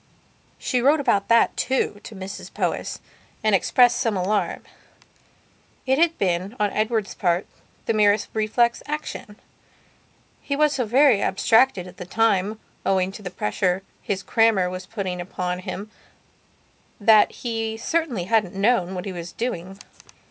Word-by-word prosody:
She 250 -2 -1
wrote 290 +5 +4
about 235 -8 +1
that, 230 0 +4
too, 255 -5 -1
to 220 - -9
Mrs 190 +1 -8
Powys, - - -2 0.5
and 215 -1 +2
expressed 245 +5 +4
some 220 -4 0
alarm. 200 +3 -1 1.2
It 265 +2 +2
had 335 0 +3
been, 185 +3 -1
on 205 -1 +1
Edward's 215 -1 -1
part, 175 0 0 0.4
the - - +1
merest 210 -1 +3
reflex 230 +2 +1
action. 300 -8 -5 1.1
He 280 - -2
was 300 0 +3
so 255 -3 -1
very 250 -2 +4
abstracted 225 0 +3
at 180 0 -13
that 180 -1 -9
time 215 -1 +1 0.2
owing 190 -1 +1
to 195 - -10
the 190 - -5
pressure 180 - -1 0.2
his 195 -1 -3
crammer 220 -6 +2
was 185 0 -7
putting 190 -4 -4
upon 180 0 -4
him 200 +3 -7 1.1
that 215 0 +5
he 225 -2 -4
certainly 265 - -1
hadn't 205 -1 +1
known 195 -3 +1
what 180 +2 -5
he 195 - -4
was 175 -1 -7
doing. 195 -6 -4
210 Hz, 145 wpm, -23 LUFS, 185-235 Hz, 1.2 s, that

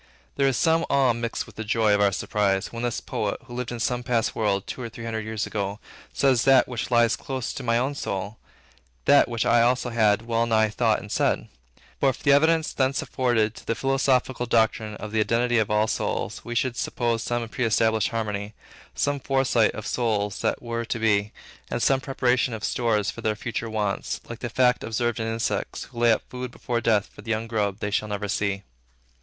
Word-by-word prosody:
There 140 -1 +2
is 135 - +1
some 165 0 +3
awe 135 -3 +3
mixed 115 0 -3
with - - -16
the 110 - -3
joy 110 0 +2
of 105 - +3
our 100 -1 +4
surprise, 100 +1 0
when 115 - -5
this 120 -2 -1
poet, 105 - -3
who 120 - -11
lived 125 -1 -4
in 120 - -5
some 125 +2 0
past 120 -2 0
world, 100 -3 0
two - - -6
or 120 - -4
three 115 +1 -9
hundred 110 -1 -3
years 110 -1 -2
ago, 100 0 -3 0.3
says 130 -4 +3
that 135 -2 +5
which 120 -2 -4
lies 120 -2 +4
close 130 -2 -4
to - - -6
my 115 -2 +1
own 130 +4 0
soul, 100 -5 -4 0.7
that 145 - +6
which 115 -2 -1
I 120 - +4
also 125 +1 +2
had 110 -2 +3
wellnigh 115 -1 +2
thought 105 - +1
and - - -10
said. - - 0 0.5
But 135 -2 +2
for - - -17
the 140 - +4
evidence 160 +3 +3
thence 135 0 +1
afforded 115 -4 +1
to - - -14
the 115 - 0
philosophical 130 -2 +1
doctrine 110 -2 +1
of 105 0 -7
the 110 - 0
identity 120 +2 +2
of 110 - 0
all 105 +1 +2
minds, - - -3
we 120 - -5
should 125 +1 0
suppose 120 -2 -1
some 120 0 -2
preestablished 110 -2 +1
harmony, 105 -2 -3 0.4
some 145 0 0
foresight 135 -5 +2
of 110 - -6
souls 105 -5 -1
that - - -1
were 115 0 -3
to 115 - -3
be, 105 -2 +1 0.4
and - - -2
some 130 +3 +2
preparation 125 -3 +1
of 110 - -8
stores 110 -4 +1
for 115 - -9
their 110 -1 0
future 115 +1 -4
wants, 105 -2 -2
like 120 -1 -7
the 120 - -4
fact 125 +1 +2
observed 115 +1 -1
in 110 - -2
insects, 115 0 -2
who 120 - -10
lay 120 -1 +5
up 110 - +1
food 125 0 -6
before 120 0 -3
death 110 -2 +2
for - - -15
the 115 - -11
young 110 0 0
grub 105 -4 -1
they 105 -1 -3
shall 105 +1 0
never 105 0 -3
see. 100 -1 -1
115 Hz, 210 wpm, -25 LUFS, 110-125 Hz, 0.7 s, that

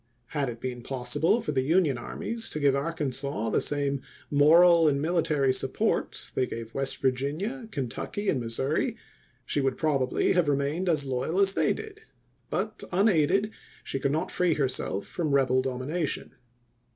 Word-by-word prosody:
Had 145 -4 -1
it 115 -1 -7
been 125 -1 -5
possible 135 - +1
for 150 - -3
the 135 -3 +1
Union 155 0 +2
armies 225 - -3
to 155 - -4
give 140 -2 +3
Arkansas 140 -6 -2
the - - +2
same 140 -2 +2 0.3
moral 165 +3 +6
and 140 -2 +2
military 150 -4 +1
support - - 0
they 130 - 0
gave 115 0 -7
West 135 0 0
Vir 130 - +5
ginia, 195 - -4
Kentucky, 145 - -4
and 140 - +2
Missouri, 125 +6 -1 0.5
she 145 - 0
would 135 -1 0
probably 140 -5 +1
have 180 -4 +2
remained 145 +6 0
as 150 -4 +1
loyal 135 +7 -1
as 195 -1 +5
they - - +2
did; 430 -1 -6 0.5
but, - - -3
unaided, 195 +1 +2 0.3
she 135 - -3
could 140 0 0
not 155 +2 -1
free 180 -3 +1
herself 130 -8 -1
from 155 -5 -1
rebel 130 -1 +3
domination. 135 +5 -3
145 Hz, 160 wpm, -27 LUFS, 130-170 Hz, 0.5 s, moral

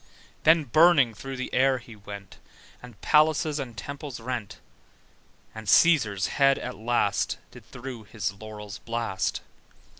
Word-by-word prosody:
Then 160 0 +6
burning 145 -2 +5
through 130 +5 -7
the 130 - -5
air 130 +1 +3
he 120 -2 -12
went, 100 -1 -10 0.4
And 125 -4 -13
palaces 155 0 +3
and 120 -5 -6
temples 140 +3 -7
rent: 115 -3 -5 1.0
And 110 -1 -9
Cæsar's 110 - +4
head 135 +5 +3
at 125 - -6
last 110 -3 0
Did - - -15
through 120 -3 -8
his 100 -2 -3
laurels 105 0 -9
blast. 115 -4 -2
120 Hz, 130 wpm, -26 LUFS, 105-140 Hz, 1.0 s, Then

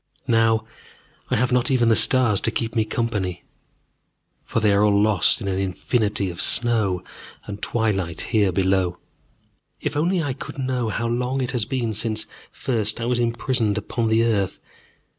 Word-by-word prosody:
Now 115 -1 +2 0.6
I - - +1
have 125 0 +1
not 125 0 +2
even 120 -3 +3
the 115 - +5
stars 120 -6 +4
to - - +1
keep 115 0 -3
me 110 -1 +2
company, 105 -6 -2 1.0
for - - -2
they 105 -2 +3
are 100 +1 +3
all 100 -1 +3
lost 105 0 +3
in 100 - -4
an 95 -1 -1
infinity 100 +1 -1
of 85 - -5
snow 110 -7 +2 0.4
and 105 -1 -8
twilight 95 -7 -1
here 105 -4 +1
below. 95 -1 +1 0.8
If - - -3
only 170 +3 +1
I 140 -3 -2
could 145 +3 -9
know 130 -3 -1
how 115 +2 -2
long 125 +3 -1
it 125 - -2
has 120 -4 0
been 120 -2 -2
since 110 +1 -1 0.3
first 110 -5 -1
I 115 - -3
was 120 0 0
imprisoned 115 -2 0
upon 115 +2 -2
the 110 +1 +3
earth. 105 -5 0
110 Hz, 170 wpm, -22 LUFS, 100-120 Hz, 1.0 s, the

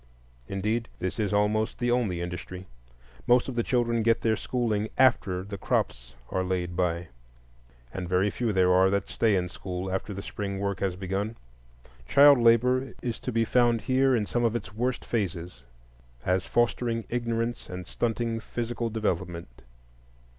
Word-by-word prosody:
Indeed, 110 +4 -1
this 95 +4 -3
is 105 -2 0
almost 105 +1 +1
the 120 0 0
only 105 -8 0
industry. 90 +1 -6 0.6
Most 120 0 +4
of 130 - -3
the 120 - +1
children 120 -1 +1
get 115 +1 +2
their 110 -1 +2
schooling 110 -2 -1
after 100 -8 +3
the 100 0 -7
"crops - - -2 0.2
are 95 - 0
laid 90 -1 -2
by," 85 -1 -1 0.8
and 90 -2 -4
very 95 +3 +2
few 120 +1 -1
there 90 -2 +4
are 95 +1 +5
that 100 +1 -1
stay 110 -3 +2
in 90 -1 0
school 90 +1 -5
after 95 +2 -3
the 100 0 -6
spring 100 -2 -4
work 100 -1 -2
has 95 -2 -1
begun. 95 +4 -3 0.7
Child 140 -1 +7
labor 125 +2 +3
is 120 -2 -3
to 125 - -4
be 115 -1 +2
found 120 -1 +3
here 130 +3 +3
in 110 -3 0
some 120 +3 -1
of 115 -1 +2
its 110 -2 -5
worst 125 +3 -2
phases, 90 - -3 0.6
as 90 0 +1
fostering 120 -1 0
ignorance 115 0 -2
and 90 0 -6
stunting 115 +3 -1
physical 120 +1 -3
development. 90 - -3
105 Hz, 160 wpm, -27 LUFS, 95-120 Hz, 0.8 s, Child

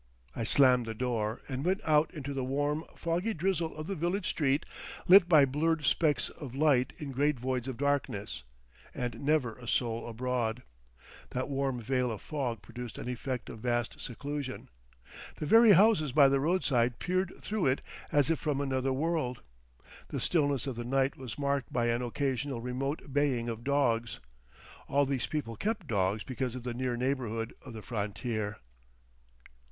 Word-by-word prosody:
I - - -2
slammed 125 -1 +4
the 110 - -4
door, 115 -2 -1
and 135 0 -3
went 185 +3 +1
out 155 0 +3
into 145 -4 -5
the 135 -1 -2
warm, 145 +4 -1
foggy 175 +7 -1
drizzle 170 -1 -1
of 155 - -5
the 195 - -3
village 180 +3 -1
street 145 -1 +1 0.4
lit 180 -1 +8
by 155 -5 +7
blurred 150 +3 0
specks 145 -3 +2
of 135 -6 -9
light 135 -3 +3
in 145 -3 -6
great 140 0 +1
voids 130 0 -2
of 130 -3 -4
darkness, 140 -8 -1 0.5
and 125 -1 -4
never 140 -6 +1
a 120 - -10
soul 115 -1 0
abroad. 120 0 -2 0.7
That 130 +2 -3
warm 135 -2 -1
veil 125 +1 0
of 110 - -5
fog 125 -8 -3
produced 120 -1 -8
an - - -6
effect 125 0 -3
of 110 - -8
vast 120 0 -1
seclusion. 140 +1 -5 0.7
The - - -4
very 225 +5 +7
houses 190 - +5
by 140 -2 +7
the 135 0 +2
roadside 135 -7 +2
peered 185 0 -1
through 210 -7 -1
it 130 +1 +1 0.3
as 145 +1 +3
if 165 - +1
from 150 -3 -1
another 135 -1 0
world. 145 -3 -1 0.6
The - - -4
stillness 145 -6 +2
of 135 -3 -3
the 120 - -4
night 135 +2 +1
was 130 -4 -7
marked 140 -2 -1
by 120 -1 +1
an 120 +1 +1
occasional 130 +1 -2
remote 135 +4 -3
baying 135 -5 +1
of 115 0 -5
dogs; 120 -5 +1 0.7
all 140 0 +3
these 135 -2 -1
people 145 -7 -3
kept 205 - -2
dogs 100 -3 0
because 130 -1 -3
of 125 - -6
the 125 -1 -3
near 125 0 -2
neighbourhood 120 -3 -2
of 130 - -9
the 110 -2 -8
frontier. 105 -1 -3
135 Hz, 170 wpm, -31 LUFS, 120-150 Hz, 0.7 s, lit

